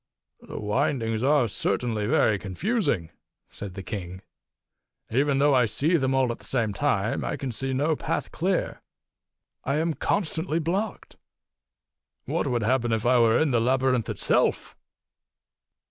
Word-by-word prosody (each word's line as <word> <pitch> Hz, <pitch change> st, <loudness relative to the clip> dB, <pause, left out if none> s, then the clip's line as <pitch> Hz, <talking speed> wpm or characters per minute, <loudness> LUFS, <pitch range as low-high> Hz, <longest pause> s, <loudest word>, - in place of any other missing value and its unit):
271 -, -, -9 dB, 0.4 s
"The 115 Hz, -, -4 dB
windings 110 Hz, -1 st, -1 dB
are 140 Hz, -1 st, +3 dB
certainly 110 Hz, 0 st, -1 dB
very 110 Hz, -2 st, +3 dB
confusing," 100 Hz, -, -1 dB, 0.4 s
said 100 Hz, -3 st, -8 dB
the 95 Hz, -, -6 dB
king. 95 Hz, -3 st, -6 dB, 0.9 s
"Even 140 Hz, +3 st, +2 dB
though 145 Hz, +1 st, +4 dB
I 125 Hz, -3 st, +4 dB
see 150 Hz, -, +1 dB
them 135 Hz, -4 st, +1 dB
all 130 Hz, -2 st, +2 dB
at 120 Hz, -, -6 dB
the -, -, -13 dB
same 115 Hz, -5 st, -1 dB
time, 110 Hz, -3 st, 0 dB
I -, -, -2 dB
can 135 Hz, -2 st, -4 dB
see 135 Hz, +4 st, -2 dB
no 145 Hz, +4 st, +1 dB
path -, -, -3 dB
clear. 185 Hz, +2 st, -1 dB, 0.8 s
I 140 Hz, -, -1 dB
am 160 Hz, +2 st, 0 dB
constantly 160 Hz, -2 st, -1 dB
blocked. 185 Hz, +6 st, -3 dB, 1.1 s
What -, -, -1 dB
would 120 Hz, -2 st, 0 dB
happen 120 Hz, 0 st, +1 dB
if 110 Hz, 0 st, -1 dB
I 125 Hz, 0 st, +4 dB
were 115 Hz, -1 st, +4 dB
in 155 Hz, -3 st, +2 dB
the 120 Hz, -2 st, +2 dB
labyrinth 130 Hz, -1 st, +1 dB
itself?" -, -, 0 dB
130 Hz, 150 wpm, -26 LUFS, 110-150 Hz, 1.1 s, though